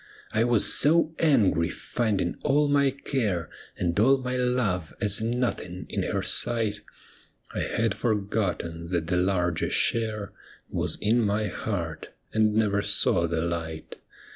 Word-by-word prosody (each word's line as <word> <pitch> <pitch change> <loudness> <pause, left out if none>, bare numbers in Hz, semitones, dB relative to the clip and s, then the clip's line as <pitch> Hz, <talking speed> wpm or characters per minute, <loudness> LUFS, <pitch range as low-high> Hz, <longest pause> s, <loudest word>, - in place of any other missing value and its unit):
I 110 +2 +2
was 115 -4 +4
so 160 +1 +4
angry, 110 - +3
finding 100 -7 -2
all 145 +2 +2
my 140 -1 +3
care 120 - -2 0.3
And 85 +2 -1
all 135 +6 +5
my 125 -1 -4
love 125 -10 -1
as 105 -1 +3
nothing 115 -6 -2
in - - -2
her - - -2
sight, 110 -3 +1 0.7
I - - -3
had 115 -3 0
forgotten 100 -7 -2
that 85 -3 -1
the 90 +2 0
larger 90 -2 0
share 110 -3 0 0.4
Was - - -2
in 115 +3 +2
my 105 0 0
heart, 85 -5 -4 0.2
and 110 -1 +2
never 105 -2 +2
saw 85 -4 +3
the 80 -1 -1
light. 80 -2 -5
105 Hz, 140 wpm, -26 LUFS, 90-120 Hz, 0.7 s, all